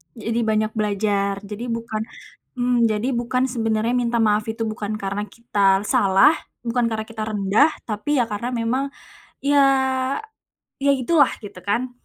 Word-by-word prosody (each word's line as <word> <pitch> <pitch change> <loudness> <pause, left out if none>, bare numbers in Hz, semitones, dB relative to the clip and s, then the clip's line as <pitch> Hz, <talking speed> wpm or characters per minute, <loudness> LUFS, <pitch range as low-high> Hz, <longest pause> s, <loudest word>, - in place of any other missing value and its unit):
Jadi 230 +1 -2
banyak 215 0 +1
belajar, 200 -1 0
jadi 210 +3 -6
bukan 230 -2 -3 0.5
mhm, 245 -1 +2
jadi 215 +2 -1
bukan 240 +1 0
sebenarnya 225 -1 0
minta 240 -1 0
maaf 210 -1 +2
itu 225 +1 -3
bukan 215 -1 -3
karena 200 0 -3
kita 200 -3 +1
salah, 195 +7 +5 0.3
bukan 240 0 0
karena 220 -1 -3
kita 225 -1 -5
rendah 210 +7 +3 0.2
tapi 275 +8 -1
ya - - +1
karena 210 +4 -3
memang 240 +4 0 0.6
iya, 285 0 +4 1.2
iya 280 0 +4
itu 260 +4 -3
lah - - +5
gitu 200 -2 -9
kan. 235 +6 0
220 Hz, 150 wpm, -22 LUFS, 210-240 Hz, 1.2 s, salah